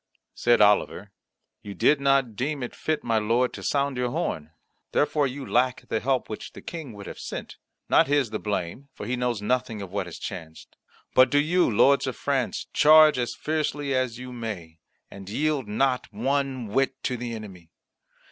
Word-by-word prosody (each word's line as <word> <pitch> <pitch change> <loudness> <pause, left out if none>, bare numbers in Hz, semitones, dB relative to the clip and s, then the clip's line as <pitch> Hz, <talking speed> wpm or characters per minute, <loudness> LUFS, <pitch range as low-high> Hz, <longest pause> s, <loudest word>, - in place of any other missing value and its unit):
Said 120 -2 +3
Oliver, 105 -1 +3 0.5
"You 100 -1 -8
did 145 -1 +3
not 135 -5 +2
deem 140 +4 -2
it 120 - -5
fit, 155 -1 -2
my 115 -2 +1
lord, 115 +4 +1
to - - -8
sound 140 -2 0
your 125 0 0
horn. 80 -9 -3 0.4
Therefore 145 -1 +2
you 135 +1 -6
lack 125 +1 0
the 110 - 0
help 130 +3 0
which 110 - -7
the - - -10
King 160 -8 -7
would 100 -1 -10
have - - -8
sent. - - -7 0.3
Not - - +4
his 140 -5 +1
the 110 - -3
blame, 105 +6 -4
for - - -7
he 125 +3 -1
knows 120 -4 -2
nothing 125 -1 -1
of 95 -3 -7
what 100 -2 -2
has 90 - -8
chanced. 80 -1 -8 0.4
But 130 0 +6
do 145 - +2
you, 170 +5 +3
lords 135 +6 +4
of 130 - -3
France, 135 -5 -1
charge 155 -2 +7
as 120 - -2
fiercely 150 -2 -2
as 130 -3 0
you 125 0 -8
may, 95 -9 -6 0.3
and 100 -1 -10
yield 145 +1 -1
not 125 +4 0
one 130 +3 -1
whit 135 +3 0
to 125 - -1
the 120 -1 -5
enemy. 95 -6 -10
125 Hz, 185 wpm, -25 LUFS, 105-140 Hz, 0.5 s, charge